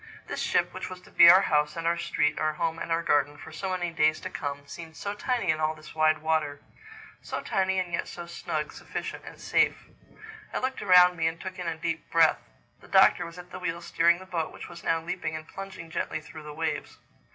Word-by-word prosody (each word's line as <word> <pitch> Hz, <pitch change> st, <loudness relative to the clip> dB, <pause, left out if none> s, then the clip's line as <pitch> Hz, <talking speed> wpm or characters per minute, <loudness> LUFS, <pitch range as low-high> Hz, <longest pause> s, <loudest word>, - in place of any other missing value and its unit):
This -, -, -5 dB
ship, -, -, +1 dB
which -, -, -5 dB
was 185 Hz, -1 st, -8 dB
to -, -, -18 dB
be 170 Hz, -, +9 dB
our 185 Hz, +3 st, +8 dB
house 150 Hz, -3 st, +1 dB
and 165 Hz, 0 st, -4 dB
our 170 Hz, +1 st, +3 dB
street, 150 Hz, -3 st, 0 dB
our 155 Hz, 0 st, +1 dB
home 165 Hz, +1 st, -2 dB
and -, -, -5 dB
our 165 Hz, +1 st, +1 dB
garden, 145 Hz, -2 st, +2 dB
for 145 Hz, -, -11 dB
so 190 Hz, +5 st, -4 dB
many 180 Hz, -2 st, -1 dB
days 155 Hz, -1 st, +2 dB
to -, -, -6 dB
come, 145 Hz, 0 st, -4 dB
seemed 160 Hz, +1 st, -10 dB
so 200 Hz, +5 st, -3 dB
tiny 220 Hz, -4 st, 0 dB
in 155 Hz, -, -2 dB
all 155 Hz, 0 st, 0 dB
this 155 Hz, 0 st, -13 dB
wide 155 Hz, 0 st, +3 dB
water—so 160 Hz, -, -4 dB
tiny 190 Hz, 0 st, 0 dB
and 180 Hz, -2 st, -2 dB
yet -, -, -1 dB
so 175 Hz, -, -7 dB
snug, 165 Hz, -2 st, -4 dB
sufficient, -, -, -7 dB
safe. -, -, +2 dB, 0.8 s
I -, -, +2 dB
looked 260 Hz, 0 st, -2 dB
around 180 Hz, -2 st, +6 dB
me 160 Hz, -1 st, +2 dB
and 165 Hz, 0 st, -3 dB
took 185 Hz, 0 st, -7 dB
in 180 Hz, -, -4 dB
a 165 Hz, -1 st, -2 dB
deep 165 Hz, 0 st, -3 dB
breath. 165 Hz, -1 st, +4 dB, 0.4 s
The -, -, -17 dB
Doctor -, -, +5 dB
was 170 Hz, +1 st, -11 dB
at 180 Hz, 0 st, -11 dB
the 185 Hz, -, -7 dB
wheel 170 Hz, -2 st, -2 dB
steering 170 Hz, 0 st, +3 dB
the 185 Hz, -, -11 dB
boat 170 Hz, -4 st, -2 dB
which -, -, -9 dB
was 170 Hz, 0 st, -11 dB
now 165 Hz, -, +2 dB
leaping 160 Hz, -1 st, -4 dB
and 155 Hz, 0 st, -7 dB
plunging 190 Hz, -4 st, -8 dB
gently 160 Hz, -, -2 dB
through 155 Hz, +1 st, -11 dB
the 150 Hz, 0 st, -8 dB
waves. 160 Hz, 0 st, -3 dB
165 Hz, 230 wpm, -28 LUFS, 155-180 Hz, 0.8 s, be